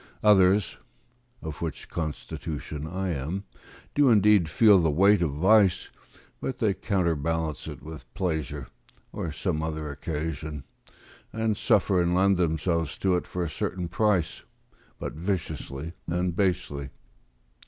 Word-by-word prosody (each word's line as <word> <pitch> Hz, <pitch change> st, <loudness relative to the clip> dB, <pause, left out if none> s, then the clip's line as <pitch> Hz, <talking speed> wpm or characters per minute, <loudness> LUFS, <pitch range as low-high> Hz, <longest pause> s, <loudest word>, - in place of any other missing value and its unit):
Others 95 Hz, -8 st, +4 dB, 0.6 s
(of 80 Hz, -2 st, -6 dB
which 80 Hz, -3 st, -4 dB
constitution 75 Hz, -1 st, -5 dB
I 95 Hz, +3 st, -3 dB
am) 85 Hz, +5 st, -3 dB, 0.5 s
do 145 Hz, -2 st, +4 dB
indeed 105 Hz, -6 st, +5 dB
feel 105 Hz, +4 st, +6 dB
the 80 Hz, -2 st, +2 dB
weight 100 Hz, +6 st, +4 dB
of 85 Hz, -, +2 dB
vice, 95 Hz, +5 st, +3 dB, 0.5 s
but 130 Hz, -, -3 dB
they 105 Hz, -3 st, +2 dB
counterbalance 80 Hz, -6 st, -1 dB
it 70 Hz, -4 st, -8 dB
with 80 Hz, 0 st, -10 dB
pleasure, 80 Hz, -7 st, -2 dB, 0.5 s
or 80 Hz, -, -4 dB
some 75 Hz, +1 st, -2 dB
other 80 Hz, -2 st, -3 dB
occasion; 75 Hz, 0 st, -4 dB, 0.7 s
and 110 Hz, -1 st, 0 dB
suffer 100 Hz, -2 st, +3 dB
and 85 Hz, 0 st, +1 dB
lend 95 Hz, +1 st, +4 dB
themselves 85 Hz, -2 st, 0 dB
to 95 Hz, -2 st, +2 dB
it 90 Hz, -, -2 dB
for 90 Hz, -, -3 dB
a -, -, -1 dB
certain 85 Hz, +3 st, -3 dB
price, 95 Hz, -1 st, +1 dB, 0.6 s
but -, -, -5 dB
viciously 80 Hz, -3 st, -4 dB
and 90 Hz, 0 st, -1 dB
basely. 75 Hz, -8 st, -1 dB
85 Hz, 130 wpm, -27 LUFS, 75-95 Hz, 0.7 s, feel